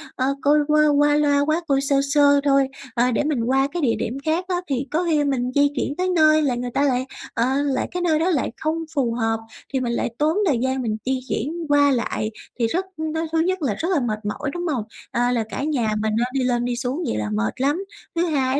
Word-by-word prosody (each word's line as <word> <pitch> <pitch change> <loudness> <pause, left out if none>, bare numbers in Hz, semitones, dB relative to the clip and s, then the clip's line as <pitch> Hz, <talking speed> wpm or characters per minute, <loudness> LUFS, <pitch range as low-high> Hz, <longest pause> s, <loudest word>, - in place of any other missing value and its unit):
ờ, 255 - 0 0.2
coi 295 +1 +4
qua 305 0 +4
qua 290 0 +4
loa 290 -1 +3
quá, 315 +3 +1
coi 275 -1 +2
sơ 280 0 +1
sơ 285 -1 +5
thôi, 275 -1 +3 0.3
ờ, 250 0 +2
để 240 - +1
mình 285 -6 0
qua 270 +3 +2
cái 350 - -3
địa 235 -5 +2
điểm 245 - -3
khác 330 +4 0
á, 365 - 0
thì 270 0 -2
có 325 +3 +1
khi 300 -2 +3
mình 255 -3 0
di 285 0 +5
chuyển 275 +2 -2
tới 370 0 0
nơi 310 -1 +5
là 270 -5 +1
người 245 0 -4
ta 280 - +1
lại, 260 -2 +1 0.3
ờ, 230 - +1 0.2
lại 270 -3 0
cái 360 - -3
nơi 320 -3 +2
đó 340 - +1
lại 295 -10 0
không 320 +1 -2
phù 245 -5 +1
hợp, 225 -1 0 0.3
thì 265 - +1
mình 240 -2 -1
lại - - -1
tốn 310 +5 +1
thời 270 -6 +2
gian 260 0 0
mình 220 -2 -2
di 260 0 0
chuyển 330 +4 -2
qua 285 -1 +5
lại, 225 -3 -1 0.3
thì 230 - +2
rất 360 +11 -1
nó 315 +1 -2
thứ 325 - +1
nhất 370 +2 0
là 250 -8 0
rất 335 - -2
là 335 - +3
mệt 215 -4 -2
mỏi, 210 +7 -3
đúng 350 0 -3
hông? 260 -9 -1 0.3
Ờ, 245 +1 +1
là 235 -2 +1
cả - - -4
nhà 280 -7 0
mình, 215 0 0
à, - - +2
đi 265 -2 0
lên 240 -1 +1
đi 245 0 -1
xuống 260 +7 -2
vậy - - -1
là 105 -1 -2
mệt 105 - -2
lắm. 300 +8 +1 0.3
Thứ 340 +1 +2
hai 275 -4 +1
280 Hz, 255 wpm, -22 LUFS, 245-310 Hz, 0.3 s, sơ